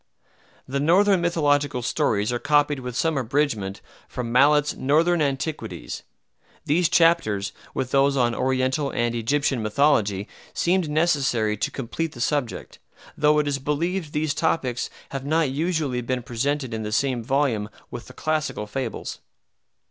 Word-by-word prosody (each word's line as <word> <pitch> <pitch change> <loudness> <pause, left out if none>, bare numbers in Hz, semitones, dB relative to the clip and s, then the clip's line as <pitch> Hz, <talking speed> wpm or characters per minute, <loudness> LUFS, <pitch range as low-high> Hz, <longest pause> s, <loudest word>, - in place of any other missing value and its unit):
The 140 +1 -2
Northern 185 +5 +4
mythological 145 -6 +1
stories 115 -5 0
are 120 - -1
copied 145 0 +2
with 125 -2 -6
some 160 0 +1
abridgment 115 -7 -1 0.3
from 120 -2 -5
Mallet's 145 +4 +4
"Northern 160 +5 +2
Antiquities." 140 - -3 0.6
These 165 +3 +2
chapters, 165 - +3 0.2
with 130 -1 -2
those 140 0 +3
on 120 -2 +2
Oriental 130 +3 0
and 120 -2 -1
Egyptian 130 +2 0
mythology, 105 -4 +2 0.3
seemed 175 -2 +1
necessary 140 -9 +1
to - - -1
complete 150 +5 -4
the 120 - -11
subject, 130 -1 -2 0.4
though 150 0 +3
it 150 -1 +1
is 140 -1 -1
believed 155 +4 -2
these 150 0 0
topics 130 -7 -1 0.2
have 135 -1 -5
not 155 0 +1
usually 150 -4 -1
been 125 +1 -2
presented 130 +2 -2
in 110 - -3
the 105 0 -4
same 125 0 0
volume 125 -5 0 0.2
with 120 - -7
the 130 - -12
classical 155 -7 -2
fables. 120 +2 -5
140 Hz, 140 wpm, -24 LUFS, 120-150 Hz, 0.6 s, Northern